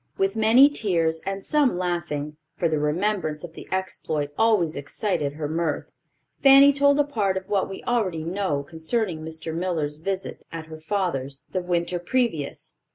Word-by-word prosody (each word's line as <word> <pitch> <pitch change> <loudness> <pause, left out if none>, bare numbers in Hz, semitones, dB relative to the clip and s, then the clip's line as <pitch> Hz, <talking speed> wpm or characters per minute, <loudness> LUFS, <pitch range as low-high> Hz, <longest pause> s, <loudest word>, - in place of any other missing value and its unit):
With 195 +1 +1
many 225 +5 +7
tears 170 - 0
and 195 0 -3
some 290 - +2
laughing—for 155 -2 -3
the 155 -2 0
remembrance 155 0 -1
of 170 -2 -8
the - - -10
exploit 160 -6 -2
always 205 -7 +2
excited 145 +1 -2
her 150 0 -4
mirth—Fanny 270 - +3
told 285 +1 +4
a - - +6
part 210 -9 0
of 190 0 -6
what 200 -2 0
we 195 - -7
already 190 -10 0
know 170 -4 -1
concerning 165 - -2
Mr. 160 0 -6
Miller's 160 -4 -2
visit 190 +3 -4
at 165 -1 -6
her 160 0 -10
father's 155 -6 -2
the 185 - -1
winter 175 0 -1
previous. 180 - -2
175 Hz, 155 wpm, -24 LUFS, 155-205 Hz, -, many